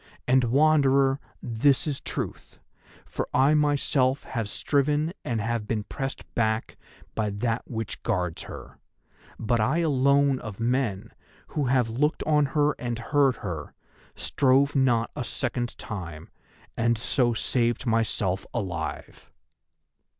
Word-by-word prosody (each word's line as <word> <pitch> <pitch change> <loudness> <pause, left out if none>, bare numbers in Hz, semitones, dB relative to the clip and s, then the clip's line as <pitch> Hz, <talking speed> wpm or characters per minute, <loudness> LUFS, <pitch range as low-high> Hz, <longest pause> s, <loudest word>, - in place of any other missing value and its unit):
And, 130 0 +4
Wanderer, 140 0 +4 0.2
this 130 +7 +2
is 145 -3 -2
truth, - - -5 0.5
for - - -4
I 135 +4 +5
myself 145 -3 +2
have 115 -5 -4
striven 150 +6 +1
and 115 -2 -2
have 115 0 -2
been 110 -2 -1
pressed 135 +5 -4
back 110 -1 0 0.4
by 110 -1 -1
that 115 +3 -2
which 115 -2 -4
guards 90 -7 -1
her. - - -10 0.6
But 115 +1 0
I 130 +9 +2
alone 140 -3 +3
of 105 -2 -8
men 115 -4 -1 0.4
who 145 - -1
have 125 -3 +2
looked 150 +7 0
on 150 -2 +3
her 150 0 +4
and 120 -2 -2
heard 135 +2 +2
her, 80 -6 -5 0.4
strove 140 +2 +2
not 120 -4 +2
a - - -3
second 120 +1 -2
time, 85 -8 -7 0.5
and 115 0 +1
so 120 0 +1
saved 120 +1 +1
myself 110 -5 +1
alive." 95 -8 -5
125 Hz, 130 wpm, -26 LUFS, 110-140 Hz, 0.6 s, I